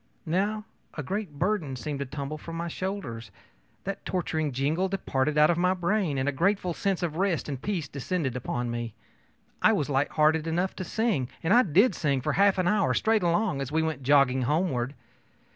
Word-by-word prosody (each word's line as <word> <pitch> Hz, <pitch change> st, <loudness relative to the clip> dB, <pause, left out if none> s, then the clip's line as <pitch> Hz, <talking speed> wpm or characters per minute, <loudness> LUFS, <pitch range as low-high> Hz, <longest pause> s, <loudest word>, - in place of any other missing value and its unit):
Now 205 Hz, +6 st, 0 dB, 0.3 s
a 150 Hz, -, -4 dB
great 190 Hz, -1 st, -4 dB
burden 175 Hz, -6 st, 0 dB
seemed 140 Hz, +3 st, -4 dB
to 140 Hz, -, -3 dB
tumble 145 Hz, +2 st, -5 dB
from 165 Hz, +1 st, -7 dB
my 170 Hz, +1 st, -3 dB
shoulders. 165 Hz, -, -4 dB, 0.5 s
That 195 Hz, +1 st, -5 dB
torturing 160 Hz, -5 st, -1 dB
jingle 150 Hz, +9 st, 0 dB
departed 150 Hz, -6 st, -1 dB
out 150 Hz, +2 st, +6 dB
of 170 Hz, -, -1 dB
my 180 Hz, +1 st, +3 dB
brain, 180 Hz, -4 st, 0 dB
and 130 Hz, +1 st, 0 dB
a -, -, +3 dB
grateful 180 Hz, +4 st, +1 dB
sense 195 Hz, 0 st, -1 dB
of 165 Hz, -2 st, -2 dB
rest 185 Hz, -3 st, 0 dB
and 135 Hz, -3 st, -4 dB
peace 180 Hz, -8 st, -2 dB
descended 140 Hz, -1 st, -2 dB
upon 120 Hz, -1 st, -2 dB
me. 120 Hz, -2 st, -4 dB, 0.7 s
I 220 Hz, -, +5 dB
was 150 Hz, -8 st, -1 dB
light 135 Hz, +1 st, +2 dB
hearted 155 Hz, +1 st, +3 dB
enough 175 Hz, +3 st, 0 dB
to -, -, -3 dB
sing; 205 Hz, -, 0 dB
and 170 Hz, +4 st, +3 dB
I 245 Hz, -, +7 dB
did 200 Hz, -, +4 dB
sing 140 Hz, -5 st, 0 dB
for 130 Hz, -, -1 dB
half 200 Hz, -1 st, +4 dB
an 185 Hz, -1 st, +1 dB
hour, 205 Hz, -1 st, +2 dB
straight 220 Hz, -1 st, +2 dB
along, 170 Hz, -4 st, +1 dB
as 135 Hz, 0 st, -4 dB
we 160 Hz, +1 st, +2 dB
went 160 Hz, -4 st, -2 dB
jogging 135 Hz, -1 st, +4 dB
homeward. 135 Hz, -2 st, 0 dB
160 Hz, 195 wpm, -27 LUFS, 140-190 Hz, 0.7 s, I